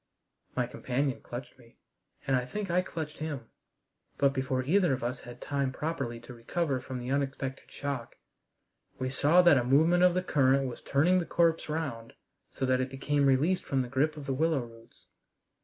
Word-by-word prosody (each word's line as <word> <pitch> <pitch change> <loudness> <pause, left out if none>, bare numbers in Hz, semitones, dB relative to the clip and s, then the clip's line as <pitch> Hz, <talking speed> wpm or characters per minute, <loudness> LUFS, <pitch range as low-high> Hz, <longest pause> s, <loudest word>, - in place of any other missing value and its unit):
My - - +1
companion 130 +1 -2
clutched 120 +2 -8
me, 115 -1 -20 0.5
and 135 -1 +2
I 125 - +1
think 195 +9 -4
I 180 +1 +3
clutched 160 -4 -6
him, 145 -7 -5 0.7
but 140 -1 +3
before 130 -1 -1
either 175 +2 +3
of 125 - -3
us 125 +1 -2
had 120 0 -11
time 140 -2 -1
properly 135 -5 -3
to 125 - -11
recover 135 +4 -1
from 130 0 -6
the 125 +1 -4
unexpected 135 -1 -2
shock, 140 -4 -4 0.8
we 130 0 -2
saw 155 +7 +5
that 170 -6 +6
a - - 0
movement 160 +8 +4
of 180 -1 +5
the 185 - +1
current 135 -4 +3
was 125 - -7
turning 175 +7 +3
the 175 - -2
corpse 165 -2 +2
round 140 -8 -4 0.4
so 130 - -3
that 130 0 +2
it 130 - -2
became 140 +1 +1
released 155 +8 +2
from 135 -1 0
the 125 - -7
grip 150 +4 +1
of 145 - -7
the 135 - -1
willow 155 0 +1
roots. 115 0 -17
135 Hz, 190 wpm, -30 LUFS, 130-160 Hz, 0.8 s, that